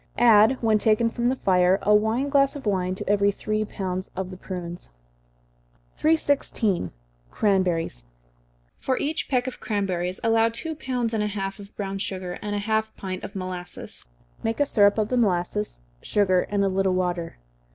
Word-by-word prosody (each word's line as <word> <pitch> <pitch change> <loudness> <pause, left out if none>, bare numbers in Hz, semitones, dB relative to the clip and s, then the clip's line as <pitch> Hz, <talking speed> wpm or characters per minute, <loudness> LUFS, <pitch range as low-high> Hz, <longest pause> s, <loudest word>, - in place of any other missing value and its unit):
Add, 230 +1 +6
when 220 -1 +4
taken 225 +2 +3
from 240 +1 0
the 260 - +1
fire, 185 -4 +3
a 210 - +4
wine 220 +6 +2
glass 275 0 +3
of 280 - -8
wine 185 -3 0
to - - -7
every 200 0 +3
three 215 +2 -2
pounds 185 -2 -4
of 185 0 -4
the - - -7
prunes. 175 -2 -7 1.1
316. 280 - +1 0.4
Cranberries. 180 - 0 0.7
For 260 -1 0
each 300 +2 -2
peck 250 -2 +1
of 260 - -5
cranberries 185 -3 -2
allow 225 0 +4
two 320 +8 -4
pounds 250 -6 -2
and 220 - +1
a - - 0
half 195 -1 -4
of 200 0 -12
brown 195 -1 -4
sugar, 185 -2 -4
and 205 0 -3
half 220 +1 0
a - - -39
pint 185 -1 -6
of - - -7
molasses. 185 - -5 0.3
Make 225 - -2
a 290 - +4
syrup 205 -5 +4
of 215 -1 +1
the 250 - +1
molasses, 175 - 0 0.2
sugar, 185 -3 +2
and 200 -1 +1
a - - +3
little 190 -1 +1
water. 175 -2 -2
205 Hz, 170 wpm, -25 LUFS, 185-225 Hz, 1.1 s, Add